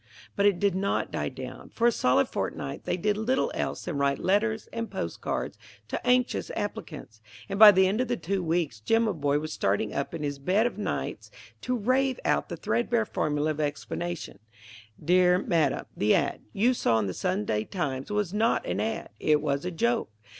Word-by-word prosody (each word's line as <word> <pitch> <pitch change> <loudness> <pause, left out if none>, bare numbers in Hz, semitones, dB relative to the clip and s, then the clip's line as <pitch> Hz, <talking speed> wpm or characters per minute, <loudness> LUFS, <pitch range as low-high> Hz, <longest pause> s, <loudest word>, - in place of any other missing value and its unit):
But 200 0 +4
it 200 -3 +3
did 200 0 +2
not 195 +2 -1
die - - -2
down. - - -9
For 235 - -1
a 240 - +6
solid 125 - +2
fortnight 70 - -4
they - - 0
did 205 +3 0
little 260 - 0
else - - -3
than 140 - -3
write 140 -1 +2
letters 220 +3 +1
and 230 -1 -3
postal 85 -1 -5
cards - - -3 0.3
to - - -4
anxious 250 0 +2
applicants, 155 - -6 0.3
and 195 0 -4
by 215 -1 +12
the 190 -1 +4
end 210 +6 +1
of 255 - -1
the - - -1
two 190 +3 -2
weeks 160 -9 -1
Jimaboy 170 - +2
was 155 +1 -5
starting 100 +2 0
up 140 +4 -3
in 160 - -5
his 145 -1 -3
bed 190 +10 +2
of 245 - -1
nights 210 - -3 0.3
to 250 0 -1
rave 255 +4 +1
out - - +1
the - - -5
threadbare 235 -1 0
formula 150 -4 0
of 155 - -5
explanation: 150 +4 -4 0.7
"Dear 180 +1 +5
Madam: 165 -7 +1
The 105 +1 +3
ad. - - 0
you 235 - +2
saw 115 - +2
in 110 - +1
the 95 - -3
Sunday 180 - -1
Times 135 - -3
was 210 -3 -1
not 220 +2 +1
an - - -2
ad.; 225 0 -2
it 150 -1 +3
was 145 0 -1
a - - 0
joke. 120 -8 0
180 Hz, 195 wpm, -27 LUFS, 145-215 Hz, 0.7 s, by